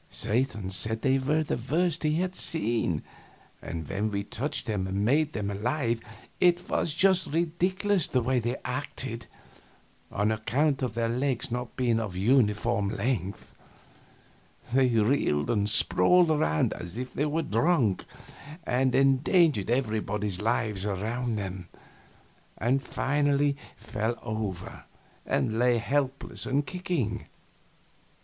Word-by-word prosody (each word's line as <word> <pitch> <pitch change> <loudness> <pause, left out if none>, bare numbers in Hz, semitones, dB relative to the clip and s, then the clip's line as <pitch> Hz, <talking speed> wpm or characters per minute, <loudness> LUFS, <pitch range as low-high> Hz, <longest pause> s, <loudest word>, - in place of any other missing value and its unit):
Satan 110 -4 -1
said 110 +4 +1
they 135 0 +3
were 150 +4 +1
the 150 - -2
worst 175 +3 +1
he 155 -1 +1
had 185 +2 -1
seen; 115 - +2 0.6
and 80 -2 -6
when 105 +2 -2
he 100 0 -2
touched 135 +8 -4
them 100 -5 -2
and 100 +2 -1
made 150 +5 +2
them 105 -1 -2
alive, 115 +3 -1 0.4
it 175 -1 +3
was 155 - 0
just 190 0 +3
ridiculous 180 +4 +1
the 125 -2 0
way 130 +1 +1
they 120 +1 -2
acted, - - -4 0.8
on 105 +2 +1
account 135 +7 0
of 125 -4 -2
their 115 -1 0
legs 125 0 -1
not 125 0 -4
being 120 -3 +1
of 105 -5 -4
uniform 105 -1 +2
lengths. 100 -2 -3 1.2
They 135 0 +4
reeled 115 - +1
and 105 -2 +1
sprawled 175 +9 +4
around 80 - +1
as 85 +4 -8
if 125 +1 -5
they 150 - 0
were 160 +2 -1
drunk, 120 - +1 0.6
and 130 -2 +1
endangered 135 - +3
everybody's 105 -5 -1
lives 110 -3 0
around 110 +4 -2
them, 95 -3 -5 0.9
and 130 +4 +1
finally 145 +2 +1 0.2
fell 110 +2 -3
over 105 -5 -5 0.4
and 110 +1 0
lay 125 -1 +4
helpless 135 +3 -2
and 145 +2 +1
kicking. 155 - -3
120 Hz, 130 wpm, -28 LUFS, 105-145 Hz, 1.2 s, They